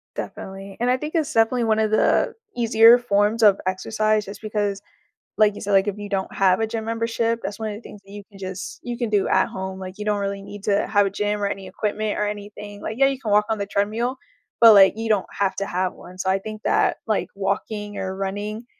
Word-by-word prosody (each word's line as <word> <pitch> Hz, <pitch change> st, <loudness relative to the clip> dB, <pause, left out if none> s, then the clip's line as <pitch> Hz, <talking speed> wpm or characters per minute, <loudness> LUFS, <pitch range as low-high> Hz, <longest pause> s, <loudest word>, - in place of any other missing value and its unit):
Definitely, 195 Hz, 0 st, -7 dB
and 245 Hz, +1 st, +1 dB
I 255 Hz, -, +4 dB
think 300 Hz, +3 st, -6 dB
it's 320 Hz, -4 st, 0 dB
definitely 230 Hz, +1 st, +2 dB
one 220 Hz, -1 st, +2 dB
of 215 Hz, -1 st, +1 dB
the 215 Hz, -, +2 dB, 0.2 s
easier 230 Hz, 0 st, +6 dB
forms 220 Hz, -1 st, +1 dB
of 200 Hz, -2 st, +6 dB
exercise 215 Hz, +3 st, 0 dB
just 200 Hz, +1 st, -10 dB
because, 205 Hz, -2 st, -2 dB, 0.6 s
like 210 Hz, -1 st, +3 dB
you -, -, -7 dB
said, 205 Hz, -, -3 dB
like, 195 Hz, +1 st, +4 dB
if 205 Hz, 0 st, -3 dB
you 205 Hz, 0 st, -6 dB
don't 195 Hz, -1 st, -2 dB
have 190 Hz, 0 st, +3 dB
a 225 Hz, -, 0 dB
gym 220 Hz, -1 st, -4 dB
membership, 230 Hz, 0 st, -1 dB
that's 205 Hz, +2 st, -5 dB
one 220 Hz, -1 st, -3 dB
of -, -, -5 dB
the 210 Hz, -, -9 dB
things 210 Hz, -, -12 dB
that 195 Hz, -, -15 dB
you 205 Hz, -, -8 dB
can 195 Hz, -, -15 dB
just 190 Hz, 0 st, -6 dB
you 240 Hz, -1 st, -4 dB
can 235 Hz, -3 st, -2 dB
do 205 Hz, -2 st, +2 dB
at -, -, +2 dB
home, 190 Hz, 0 st, -6 dB
like, 185 Hz, 0 st, -7 dB
you 210 Hz, -, -5 dB
don't 210 Hz, -1 st, 0 dB
really 200 Hz, 0 st, -3 dB
need 200 Hz, 0 st, -10 dB
to 200 Hz, -1 st, +1 dB
have 205 Hz, -1 st, +3 dB
a -, -, -1 dB
gym 205 Hz, +1 st, -2 dB
or -, -, +2 dB
any 195 Hz, -1 st, -5 dB
equipment 215 Hz, 0 st, -2 dB
or 210 Hz, -, 0 dB
anything, 205 Hz, 0 st, -8 dB
like, 220 Hz, -, -5 dB
yeah, 270 Hz, +1 st, +5 dB
you 270 Hz, -1 st, 0 dB
can 220 Hz, -6 st, -3 dB
walk 210 Hz, 0 st, +4 dB
on 220 Hz, -, 0 dB
the 200 Hz, -, -3 dB
treadmill, 220 Hz, +6 st, -1 dB, 0.4 s
but, 230 Hz, -1 st, +10 dB
like, 195 Hz, -2 st, +8 dB
you 225 Hz, 0 st, -3 dB
don't 210 Hz, -3 st, +2 dB
have 200 Hz, -1 st, 0 dB
to 200 Hz, -, -2 dB
have 185 Hz, 0 st, -1 dB
one, 180 Hz, -, -13 dB
so 190 Hz, 0 st, -1 dB
I 190 Hz, -, +2 dB
think 215 Hz, +2 st, -8 dB
that, -, -, +2 dB
like, 215 Hz, -, +1 dB
walking 205 Hz, +1 st, -3 dB
or 190 Hz, 0 st, -3 dB
running, 205 Hz, +4 st, -4 dB
210 Hz, 250 wpm, -23 LUFS, 195-220 Hz, 0.6 s, but